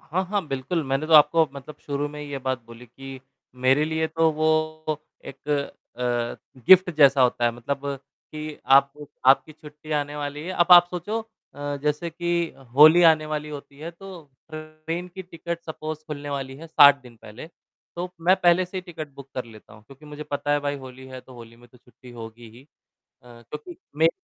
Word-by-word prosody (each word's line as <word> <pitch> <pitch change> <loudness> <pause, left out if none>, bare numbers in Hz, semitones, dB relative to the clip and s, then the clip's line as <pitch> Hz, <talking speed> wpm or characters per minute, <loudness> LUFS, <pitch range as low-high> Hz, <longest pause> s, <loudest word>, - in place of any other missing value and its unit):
हाँ, 185 +4 -2
हाँ, 205 -5 -1
बिल्कुल, 135 +6 -2
मैंने 135 +3 -1
तो 160 - -2
आपको 155 +1 +6
मतलब 140 +2 -10
शुरू 145 0 -3
में 150 0 -9
ही 150 - -7
ये 140 - -4
बात 130 -1 -3
बोली 115 +1 -13
कि, 135 +2 -11 0.3
मेरे 130 +4 +2
लिए 160 0 -1
तो 160 0 +2
वो 155 0 -1 0.2
एक 135 +2 -12 0.5
अ, 120 +1 -4
गिफ्ट 185 -1 +7
जैसा 140 -3 +6
होता 120 -1 +2
है, 120 - +3
मतलब 120 +4 -4 0.5
कि 155 -1 -6
आप 140 0 +5 0.3
आपकी 135 +4 +4
छुट्टियाँ 150 0 -5
आने 145 0 -6
वाली 145 0 -5
है, 180 - -5
अब 175 -2 +2
आप 175 0 +9
सोचो 195 +6 -3 0.3
अ, 145 0 -4
जैसे 150 +3 -1
कि 175 +1 -4 0.4
होली 155 +5 +8
आने 155 -1 0
वाली 150 0 -4
होती 140 -1 -10
है, 160 +3 -6
तो 175 -4 -12 0.2
ट्रेन 155 +3 -6
की 190 +2 -9
टिकट 170 -1 -6
सपोज़ 155 -1 -6
खुलने 145 -1 -6
वाली 135 -1 -5
है 165 +4 -10
60 145 -3 +7
दिन 120 -2 -15
पहले। 110 +6 -11 0.5
तो 175 +1 -3
मैं 180 +3 +5
पहले 180 0 +3
से 185 +2 -9
ही - - -1
टिकट 165 -4 -8
बुक 140 -1 -12
कर 130 - -3
लेता 110 -2 -16
हूँ, 105 - -17
क्योंकि 135 +5 -17
मुझे 150 0 -8
पता 145 0 -1
है 145 - +2
भाई 145 0 -2
होली 130 -1 -11
है, 130 -1 -9
तो 130 - -17
होली 115 -1 -13
में 120 +1 -19
तो 125 - -21
छुट्टी 125 0 -17
होगी 115 0 -10
ही। 125 - -15 0.6
अ, - - -22
क्योंकि 125 +8 -11 0.2
मेरी 160 +2 +4
150 Hz, 200 wpm, -24 LUFS, 130-160 Hz, 0.6 s, आप